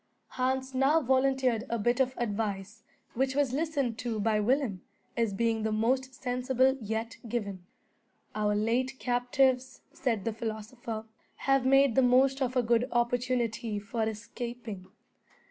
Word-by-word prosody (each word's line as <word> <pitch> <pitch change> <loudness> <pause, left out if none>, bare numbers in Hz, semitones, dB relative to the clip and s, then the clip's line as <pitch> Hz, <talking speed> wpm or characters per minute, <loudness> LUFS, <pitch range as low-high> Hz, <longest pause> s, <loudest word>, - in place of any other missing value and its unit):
Hans 260 +1 -1
now 270 +5 +4
volunteered 260 -3 +2
a 235 - 0
bit 240 +3 +1
of 260 -1 +1
advice, 210 -2 -3 0.3
which 265 +2 0
was 280 -3 +1
listened 280 -6 -1
to 230 -3 -2
by 215 0 +2
Willem, 225 -4 +1 0.3
as 230 -3 +1
being 225 +2 0
the 220 0 -1
most 255 +4 0
sensible 255 +1 +2
yet 220 +2 -3
given. 200 -6 -4 0.7
"Our 210 -1 +1
late 245 +5 0
captives," 255 +1 +1
said 230 -7 -1
that 225 -1 -2
philosopher, 220 0 -5 0.4
"have 270 -1 +3
made 270 -1 +5
the 265 - +4
most 265 +2 +4
of 255 0 0
a 250 - +3
good 235 +1 +2
opportunity 240 -2 0
for 225 +3 -4
escaping. 225 -3 -7
240 Hz, 140 wpm, -29 LUFS, 220-260 Hz, 0.7 s, made